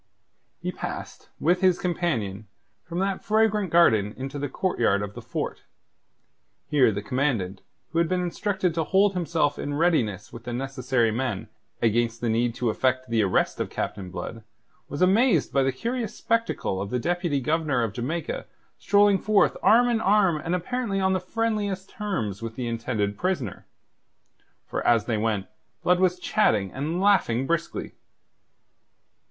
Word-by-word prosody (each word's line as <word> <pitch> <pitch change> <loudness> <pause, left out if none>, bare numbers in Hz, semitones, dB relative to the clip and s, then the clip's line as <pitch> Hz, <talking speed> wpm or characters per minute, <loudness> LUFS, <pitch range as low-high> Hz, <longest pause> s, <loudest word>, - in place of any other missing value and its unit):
He - - -3
passed, - - -7
with 180 +3 +2
his 185 -2 +4
companion, 115 - -2 0.4
from 170 - -6
that 195 +1 -1
fragrant 215 -2 +2
garden 110 -12 +4
into 135 +2 -5
the 145 0 -3
courtyard 120 - +1
of 105 0 -6
the - - -8
fort. - - -4 1.1
Here 140 -6 +4
the 100 0 -4
Commandant, 110 -7 -1 0.3
who 165 - 0
had 170 -1 +2
been 185 - +1
instructed 180 0 -1
to 165 0 0
hold 195 +3 +3
himself 165 -5 0
in 145 0 -3
readiness 120 - +1
with 115 0 -10
the 120 - -4
necessary 130 -2 0
men 115 -3 -3 0.3
against 115 +1 +1
the 120 - -1
need 115 +1 +1
to 120 -3 0
effect 130 +1 0
the 115 -1 +3
arrest 95 -3 +1
of - - -2
Captain 95 -3 -4
Blood, 95 +5 -6 0.5
was 145 +5 -1
amazed 195 - +3
by 140 - +4
the 135 0 +2
curious 230 - -3
spectacle 230 - -1
of 100 - -4
the 125 - 0
Deputy 175 +1 0
Governor 145 -2 0
of 110 -3 -2
Jamaica 165 - -3 0.3
strolling 205 -1 +4
forth 215 0 +3
arm 240 +3 +5
in 235 -2 +1
arm 195 -5 +3
and 170 +2 0
apparently 215 +2 -2
on 190 0 +2
the 185 - +1
friendliest 205 -1 -2
terms 160 - -3
with 115 -1 -5
the 125 - -3
intended 115 -3 -2
prisoner. 175 - -2 1.0
For - - -3
as 115 -3 +3
they 115 -2 0
went, 105 -3 0 0.4
Blood 180 0 +3
was 185 -1 +2
chatting 100 - +1
and 155 +6 -2
laughing 185 - +3
briskly. 170 +2 -2
145 Hz, 160 wpm, -25 LUFS, 115-185 Hz, 1.1 s, arm